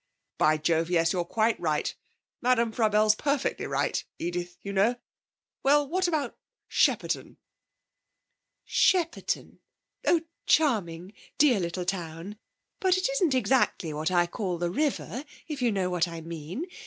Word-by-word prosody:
'By 155 0 +4
jove, 165 +2 +1
yes, 165 -2 +2
you're 180 -2 0
quite 220 +5 +1
right. 155 -3 0 0.5
Madame 240 -2 +2
Frabelle's 215 -1 +3
perfectly 280 +4 -1
right, - - -1
Edith, 175 +1 -4
you 200 - -5
know. 205 +5 +3 0.7
Well, 290 +1 +4
what 370 +4 +1
about 305 -7 -2 0.3
Shepperton?' - - +1 1.3
'Shepperton? 360 +7 +1 0.5
Oh, 335 - +4 0.3
charming! 195 - +1 0.2
Dear 270 -8 +5
little 175 0 -3
town. 175 +2 -4 0.4
But 370 -1 +3
it 375 +6 0
isn't 370 - +1
exactly 220 -9 +1
what 155 +2 -1
I 175 -1 +3
call 180 0 -3
the 170 0 -1
river, 280 - -1 0.2
if 300 -4 -5
you 240 -2 +3
know 190 -3 -1
what 175 -1 +1
I 165 -1 -7
mean. 165 - -6
205 Hz, 135 wpm, -28 LUFS, 170-275 Hz, 1.3 s, Dear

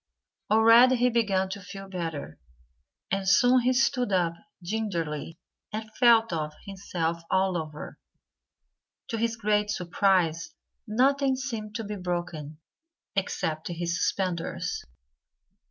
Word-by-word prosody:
Already 230 +4 +7
he 250 +1 +3
began 200 -5 +1
to 200 +1 -6
feel 195 +1 -9
better. 165 - -5 0.7
And 195 0 0
soon 250 +3 +5
he 250 +1 +2
stood 250 -3 +1
up 175 -3 +2 0.3
gingerly 170 -6 -3 0.3
and 215 0 -6
felt 230 -5 +5
of 155 -2 -2
himself 170 -4 -3
all 190 -1 +2
over. 155 -2 -6 1.1
To 230 - -2
his 230 0 0
great 210 -1 +1
surprise, 175 -4 +1 0.3
nothing 265 +4 +2
seemed 225 -5 -5
to 225 - -3
be 210 0 -5
broken 175 -4 -4 0.6
except 160 -5 -2
his 170 0 -2
suspenders. 180 -2 -2
195 Hz, 115 wpm, -27 LUFS, 170-225 Hz, 1.1 s, Already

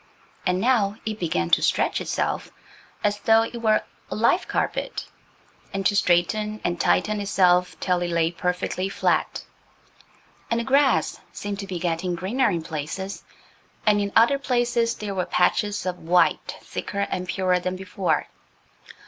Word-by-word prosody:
And 180 0 +1
now 215 -3 +2
it 220 -1 -3
began 85 - -1
to - - +5
stretch - - +1
itself, - - -2 0.5
as 205 0 +1
though 225 +2 +4
it 235 +1 -6
were 215 -1 +3 0.3
a - - -4
live - - +2
carpet, - - -2 0.7
and 195 -1 -3
to 205 - +3
straighten 210 +4 +1
and 175 -1 -1
tighten 210 -1 +2
itself 180 -2 +2
till 180 -1 0
it 175 - -1
lay 170 -1 +1
perfectly 180 +2 -2
flat. - - 0 1.1
And 230 - +1
the - - -1
grass 275 +2 +2
seemed 205 -1 -5
to 195 - -5
be 185 -2 -4
getting 175 +1 -1
greener 210 +9 +1
in 170 -5 -2
places. 165 +5 -5 0.6
And 210 -1 +4
in 200 0 -2
other 240 +5 +5
places 240 -3 +1
there 205 -2 -5
were 185 -2 -2
patches 205 +3 +1
of 180 -1 -3
white 170 +1 +2
thicker 200 - -4
and 185 0 -3
purer 185 -1 +1
than 185 +1 -3
before. 185 -4 -1
195 Hz, 155 wpm, -24 LUFS, 180-215 Hz, 1.1 s, to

